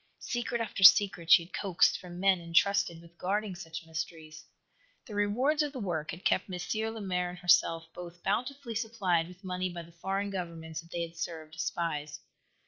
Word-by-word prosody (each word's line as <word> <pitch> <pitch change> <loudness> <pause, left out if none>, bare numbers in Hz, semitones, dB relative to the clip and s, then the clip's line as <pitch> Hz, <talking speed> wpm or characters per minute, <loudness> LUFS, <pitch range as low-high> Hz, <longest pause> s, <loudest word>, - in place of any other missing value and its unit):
Secret 240 -1 -2
after 225 -3 -4
secret 190 -3 +7
she 170 - +8
had 170 - -17
coaxed 190 -4 +2
from 175 -1 -9
men 190 -2 +3
entrusted 170 +1 +2
with 170 0 -18
guarding 205 +2 -1
such 165 -2 -8
mysteries. 160 -1 -6 0.6
The 220 - -10
rewards 240 +10 +2
of 295 -1 -1
the 260 - -5
work 170 -7 -3
had 175 +3 -7
kept 190 - +2
M. 180 - -4 0.4
Lemaire 180 -4 -1
and 180 - -8
herself 165 -2 +3
both 175 0 -10
bountifully 250 +4 -2
supplied 205 -7 0
with 180 +2 -14
money 185 0 -2
by 175 -1 -7
the 170 - -16
foreign 195 +4 -3
governments 165 -3 -5
that 165 - -19
they 170 0 -2
had 165 0 -8
served 160 -2 -5
as 160 - -4
spies. 150 -3 -3
180 Hz, 185 wpm, -30 LUFS, 165-200 Hz, 0.6 s, she